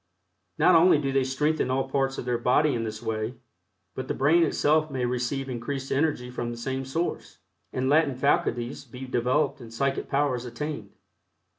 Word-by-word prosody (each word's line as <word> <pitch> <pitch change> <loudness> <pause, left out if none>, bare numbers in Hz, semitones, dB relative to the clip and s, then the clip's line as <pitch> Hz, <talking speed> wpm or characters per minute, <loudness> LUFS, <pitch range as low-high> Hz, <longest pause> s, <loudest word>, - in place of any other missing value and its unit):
Not 180 - +5
only 170 0 +6
do 140 -2 -1
they 135 0 +2
strengthen 140 +2 0
all 130 +1 0
parts 135 0 0
of - - -5
their 120 -1 0
body 140 +5 +3
in 115 -1 -1
this 110 0 -6
way, 110 +2 -2 0.6
but 130 +4 -5
the - - -2
brain 155 +6 +4
itself 155 -1 +2
may 130 -3 -2
receive 125 +2 -2
increased 135 +2 -4
energy 135 -4 0
from 120 -1 -3
the 120 - -6
same 130 +2 -3
source, 165 +6 -3 0.3
and 130 0 -1
latent 145 -2 +3
faculties 125 -2 0
be 130 0 -9
developed 130 +3 0
and 115 -1 -10
psychic 135 +4 -1
powers 140 -3 +1
attained. 125 -3 -5
135 Hz, 175 wpm, -26 LUFS, 125-145 Hz, 0.6 s, only